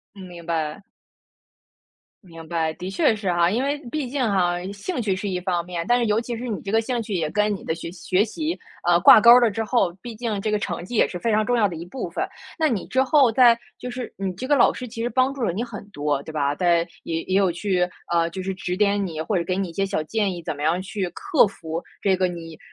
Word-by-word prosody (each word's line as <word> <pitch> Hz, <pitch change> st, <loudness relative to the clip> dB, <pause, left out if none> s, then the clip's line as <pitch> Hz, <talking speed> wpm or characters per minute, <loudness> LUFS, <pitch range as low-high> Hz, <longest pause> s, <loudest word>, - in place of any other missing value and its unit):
嗯， 195 Hz, -, -10 dB
明 175 Hz, -2 st, -11 dB
白。 160 Hz, +1 st, -2 dB, 1.4 s
明 165 Hz, -3 st, -12 dB
白。 165 Hz, -2 st, 0 dB
的 180 Hz, +3 st, -6 dB
确 195 Hz, +3 st, +3 dB
是 200 Hz, -4 st, -1 dB
哈。 175 Hz, 0 st, +3 dB
因 230 Hz, +6 st, 0 dB
为 290 Hz, +1 st, -1 dB
毕 295 Hz, -2 st, -2 dB
竟 275 Hz, +3 st, -3 dB
哈， 185 Hz, -6 st, +2 dB, 0.2 s
兴 250 Hz, -, -4 dB
趣 200 Hz, -5 st, 0 dB
是 200 Hz, +2 st, -3 dB
一 180 Hz, -1 st, -2 dB
方 175 Hz, -2 st, -1 dB
面， 175 Hz, -1 st, -4 dB
但 245 Hz, 0 st, +4 dB
是 240 Hz, -, +1 dB
尤 210 Hz, +1 st, +2 dB
其 235 Hz, 0 st, -5 dB
是 245 Hz, +2 st, -5 dB
你 210 Hz, -4 st, -3 dB
这 195 Hz, -, -5 dB
个 225 Hz, +2 st, +3 dB
兴 240 Hz, +1 st, -2 dB
趣 215 Hz, -2 st, -5 dB
也 160 Hz, -4 st, -1 dB
跟 210 Hz, +2 st, +1 dB
你 195 Hz, -, -8 dB
的 160 Hz, -, -1 dB
学 165 Hz, 0 st, -7 dB
学 185 Hz, +2 st, +1 dB
习， 315 Hz, +9 st, -3 dB, 0.3 s
嗯， 175 Hz, 0 st, +5 dB
挂 190 Hz, -, +9 dB
钩 235 Hz, -, +8 dB
了 235 Hz, -2 st, +3 dB
之 225 Hz, +2 st, -2 dB
后， 210 Hz, -6 st, +1 dB
毕 240 Hz, -2 st, -7 dB
竟 220 Hz, -3 st, -3 dB
这 215 Hz, -, -1 dB
个 210 Hz, -, +1 dB
成 195 Hz, -, -4 dB
绩 215 Hz, -, -8 dB
也 -, -, +4 dB
是 180 Hz, -, -5 dB
非 225 Hz, +5 st, 0 dB
常 215 Hz, 0 st, +3 dB
重 245 Hz, +1 st, +2 dB
要 220 Hz, -3 st, +4 dB
的 175 Hz, -, -6 dB
一 165 Hz, -, -6 dB
部 220 Hz, +9 st, -5 dB
分。 -, -, -2 dB, 0.3 s
那 315 Hz, -1 st, +3 dB
你 225 Hz, -9 st, -2 dB
之 260 Hz, -, +2 dB
后 270 Hz, -3 st, +4 dB
在 235 Hz, -1 st, +6 dB, 0.2 s
就 250 Hz, -, -6 dB
是 245 Hz, 0 st, -6 dB
你 195 Hz, -1 st, -3 dB
这 250 Hz, +8 st, -5 dB
个 290 Hz, -, +3 dB
老 255 Hz, -, +5 dB
师 250 Hz, -, -7 dB
其 230 Hz, 0 st, -6 dB
实 240 Hz, -, 0 dB
帮 255 Hz, +3 st, +2 dB
助 275 Hz, -2 st, -6 dB
了 210 Hz, -, +1 dB
你 215 Hz, +7 st, -2 dB
很 210 Hz, -4 st, -9 dB
多， 145 Hz, -4 st, -1 dB
对 155 Hz, -, -9 dB
吧？ 145 Hz, -2 st, 0 dB
在 170 Hz, 0 st, +2 dB, 0.2 s
也 165 Hz, 0 st, -2 dB
也 190 Hz, -, -1 dB
有 195 Hz, -2 st, +3 dB
去， 180 Hz, 0 st, 0 dB, 0.2 s
呃， 170 Hz, -1 st, +3 dB
就 190 Hz, +2 st, -5 dB
是 190 Hz, +1 st, -3 dB
指 180 Hz, -1 st, -3 dB
点 205 Hz, 0 st, +2 dB
你 160 Hz, -3 st, -5 dB
或 190 Hz, +6 st, -1 dB
者 170 Hz, -, 0 dB
给 185 Hz, +2 st, -1 dB
你 195 Hz, -1 st, -1 dB
一 -, -, -9 dB
些 195 Hz, +4 st, 0 dB
小 190 Hz, -5 st, -1 dB
建 205 Hz, +3 st, 0 dB
议， 175 Hz, -, -7 dB
怎 160 Hz, -1 st, -3 dB
么 145 Hz, -, -7 dB
样 165 Hz, +4 st, +1 dB
去 195 Hz, -1 st, -3 dB
克 360 Hz, -, +3 dB
服 165 Hz, -4 st, -6 dB, 0.2 s
这 195 Hz, -2 st, +3 dB
个 185 Hz, 0 st, +1 dB
你， 165 Hz, -2 st, -8 dB
195 Hz, 290 characters per minute, -23 LUFS, 175-230 Hz, 1.4 s, 挂